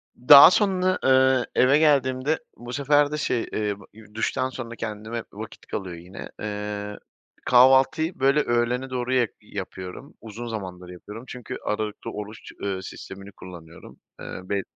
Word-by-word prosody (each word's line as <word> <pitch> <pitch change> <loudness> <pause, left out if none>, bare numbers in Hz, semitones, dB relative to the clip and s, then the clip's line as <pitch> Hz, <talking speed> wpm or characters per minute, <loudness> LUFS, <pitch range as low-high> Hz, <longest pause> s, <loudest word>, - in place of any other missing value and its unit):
Daha 140 +7 +9
sonra, 185 -3 +2
ııı, 130 -1 +4
eve 135 +3 +5
geldiğimde 140 -1 +2 0.2
bu 120 +1 -9
sefer 145 +1 +2
de 150 - -2
şey, 120 -5 0
eee, 105 -1 -3
b 105 - -17
ııı, 105 0 -17
duştan 130 +3 -1
sonra 120 -3 -7
kendime 110 +1 -5
vakit 110 +2 -10
kalıyor 95 -4 -5
yine. 90 +3 -10
Eee, 105 -1 -5 0.5
kahvaltıyı, 130 +6 +4
böyle, 140 +3 +3
öğlene 120 +2 0
doğru 125 0 -2
ya 125 -3 +3
yapıyorum. 95 +4 -8
Uzun 115 +2 -8
zamandır 90 -5 -7
yapıyorum 105 +6 -10
çünkü, 125 0 -7
aralıklı 105 0 -3
oruç, 105 +1 -8
ııı, 95 -2 -3
sistemini 100 +1 -10
kullanıyorum. 85 -3 -13 0.2
Eee, - - -7
be 100 -1 0
115 Hz, 145 wpm, -24 LUFS, 105-130 Hz, 0.5 s, Daha